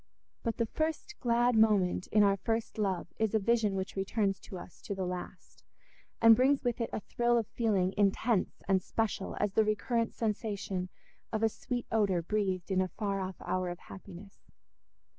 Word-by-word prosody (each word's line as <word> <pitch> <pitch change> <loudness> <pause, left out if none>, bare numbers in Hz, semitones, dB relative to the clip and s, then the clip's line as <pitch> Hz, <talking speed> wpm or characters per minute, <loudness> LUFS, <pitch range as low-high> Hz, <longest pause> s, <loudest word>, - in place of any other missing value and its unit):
But 230 -2 -2
the 230 - +1
first 315 - -2
glad 240 0 +2
moment 210 -5 +3
in 210 -1 +4
our 200 -1 +4
first 225 +2 -2
love 195 -4 -1
is 220 -1 +1
a - - +4
vision 215 -1 +2
which 190 0 -3
returns 195 0 0
to 190 - -9
us 175 - -11
to 200 - -4
the 190 -1 -2
last, 180 0 -7 0.6
and 230 -1 +8
brings 270 +4 +3
with 245 -1 -1
it 230 - -1
a - - -3
thrill 240 +2 +1
of 230 - +1
feeling 195 -5 +1
intense 205 +1 +1
and 190 -1 +3
special 215 -1 -2
as 205 -1 0
the 220 - +4
recurrent 225 +2 0
sensation 205 -4 -2 0.4
of 220 -1 -1
a 225 - +5
sweet 245 +2 -4
odour 200 -6 +2
breathed 190 -1 -1
in 185 0 +3
a 185 - +1
far 200 0 -2
off 190 -1 -4
hour 185 -1 -1
of 175 - -5
happiness. 195 +1 -12
210 Hz, 180 wpm, -31 LUFS, 190-230 Hz, 0.6 s, and